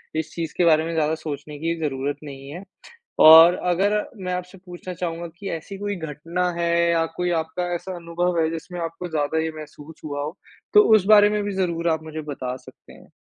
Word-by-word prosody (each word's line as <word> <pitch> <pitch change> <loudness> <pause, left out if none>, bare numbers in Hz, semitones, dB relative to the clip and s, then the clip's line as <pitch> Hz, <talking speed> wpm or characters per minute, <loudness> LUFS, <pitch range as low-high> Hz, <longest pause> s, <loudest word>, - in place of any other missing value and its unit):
इस 160 -1 -3
चीज़ 165 -2 -4
के 175 - +3
बारे 160 -1 +4
में 165 - -4
ज़्यादा 155 0 +1
सोचने 150 -1 -7
की 165 +2 -1
ज़रूरत 140 -1 -2
नहीं 135 -1 -9
है 175 +6 -8 0.6
और 165 +2 +10 0.2
अगर 205 +4 +1 0.3
मैं 180 - -2
आपसे 180 +1 -6
पूछना 180 0 -8
चाहूँगा 170 -1 -4
कि 195 0 -6
ऐसी 165 +5 -6
कोई 205 0 -3
घटना 165 +2 -3
है 170 0 0 0.2
या 165 -1 +2
कोई 180 0 -1
आपका 160 +3 -4
ऐसा 185 +2 -6
अनुभव 170 0 -1
है 160 - +1
जिसमें 175 +2 -7
आपको 165 +2 -5
ज़्यादा 155 0 -1
ये 160 - -2
महसूस 155 0 -11
हुआ 145 -1 -4
हो, 155 +6 -6 0.4
तो 420 - +9
उस 195 -3 +2
बारे 210 -1 +7
में 210 -1 -1
भी 205 - -3
ज़रूर 170 -3 0
आप 160 -1 -1
मुझे 155 0 -6
बता 135 -4 -5
सकते - - -17
हैं? - - -17
165 Hz, 210 wpm, -23 LUFS, 155-180 Hz, 0.6 s, और